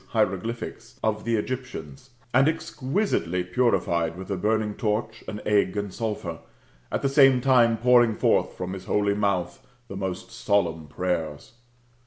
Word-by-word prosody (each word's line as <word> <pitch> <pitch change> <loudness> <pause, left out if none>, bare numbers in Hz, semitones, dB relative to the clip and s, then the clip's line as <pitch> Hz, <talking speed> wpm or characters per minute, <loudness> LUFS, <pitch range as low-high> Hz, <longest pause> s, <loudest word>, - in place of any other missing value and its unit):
hieroglyphics] 115 +5 -2
of 110 0 0
the 115 -1 +1
Egyptians, 130 +3 -5 0.2
and 135 +3 +5
exquisitely 140 - -1
purified 90 -5 +1
with 95 +2 -7
a - - +1
burning 105 +2 0
torch, 110 +1 -2
an 105 - -5
egg, 105 -2 +2
and 100 -2 -3
sulphur, 105 -8 -4 0.5
at - - -2
the - - +3
same 135 -2 +6
time 120 -3 +4
pouring 120 -1 +4
forth - - +2
from 90 0 -4
his 95 -1 -7
holy 100 -1 +1
mouth 100 -4 -1 0.3
the 95 - -6
most 95 +2 -4
solemn 90 -9 0
prayers. 80 -2 -3
105 Hz, 145 wpm, -25 LUFS, 90-120 Hz, 0.5 s, same